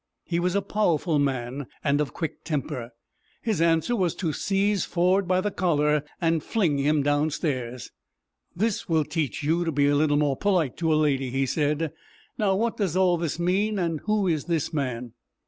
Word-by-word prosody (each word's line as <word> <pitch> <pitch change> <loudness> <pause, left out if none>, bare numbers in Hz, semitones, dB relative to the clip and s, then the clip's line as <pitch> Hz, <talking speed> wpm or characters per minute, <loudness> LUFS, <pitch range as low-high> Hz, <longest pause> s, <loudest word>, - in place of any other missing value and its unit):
He 170 -1 -1
was 180 +2 0
a 200 - +1
powerful 175 -6 +1
man, 135 -1 -2 0.2
and 145 0 +2
of 145 - -2
quick 160 -4 -5
temper. 130 -6 -3 0.5
His 215 -7 0
answer 165 +7 +2
was 180 -6 0
to 165 -5 -2
seize 200 +1 +1
Ford 180 +2 +1
by 185 0 +2
the 210 +1 -1
collar 150 -5 +2 0.2
and 165 -2 +1
fling 165 -7 0
him 145 +1 +2
downstairs. 145 -4 -1 0.6
"This 215 +2 -1
will 160 -2 +2
teach 150 -2 -2
you 165 +4 +1
to 165 - -1
be 145 0 +3
more 145 -1 +2
polite 180 -10 +1
to 165 -2 0
a - - +4
lady," 135 -4 +1
he 135 +2 0
said. 150 +2 0 0.4
"Now, 200 -3 +1
what 230 +3 0
does 185 -5 0
all 180 -2 +4
this 165 -2 -2
mean, 195 +5 +1
and 165 -4 -1
who 210 -2 +1
is 160 -4 0
this 165 -4 -1
man?" 125 -5 -3
160 Hz, 180 wpm, -25 LUFS, 145-185 Hz, 0.6 s, a